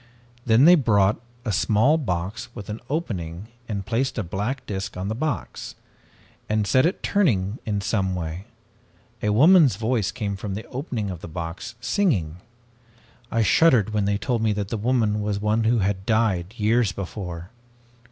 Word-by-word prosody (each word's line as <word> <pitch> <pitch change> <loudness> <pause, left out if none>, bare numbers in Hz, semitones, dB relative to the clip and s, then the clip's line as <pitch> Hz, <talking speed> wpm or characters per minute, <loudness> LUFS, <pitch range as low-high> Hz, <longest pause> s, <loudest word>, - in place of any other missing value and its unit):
Then 115 +4 +6
they 175 - +9
brought 105 - +3 0.2
a 110 - 0
small 110 - +3
box 95 - -3
with 105 -4 -8
an 110 - -5
opening 100 - -4 0.2
and 100 -3 -3
placed 125 +4 -1
a 110 - 0
black 105 +9 -3
disk 95 -3 -5
on 95 +2 -3
the - - -1
box, 150 +6 -4 0.7
and 105 -1 +1
set 130 +8 +4
it 185 - -4
turning 110 - +1
in 105 -2 -1
some 95 -2 0
way. 85 +2 -5 0.8
A 105 - 0
woman's 150 - +6
voice 110 -1 0
came 105 -5 -3
from 95 0 -5
the 110 - -6
opening 125 - -3
of 90 -2 -8
the - - -7
box, 85 +7 -6
singing. 110 - 0 0.9
I 115 -2 +1
shuddered 110 - +4
when 105 -2 +1
they 100 0 +1
told 120 +1 -1
me 110 -1 +2
that 100 -1 -3
the 115 - -2
woman 110 -2 +1
was 105 -1 -1
one 105 +2 +1
who 120 +2 +3
had 95 -1 -2
died 110 -4 +1
years 110 0 +2
before. 90 -2 -6
105 Hz, 170 wpm, -24 LUFS, 95-120 Hz, 0.9 s, they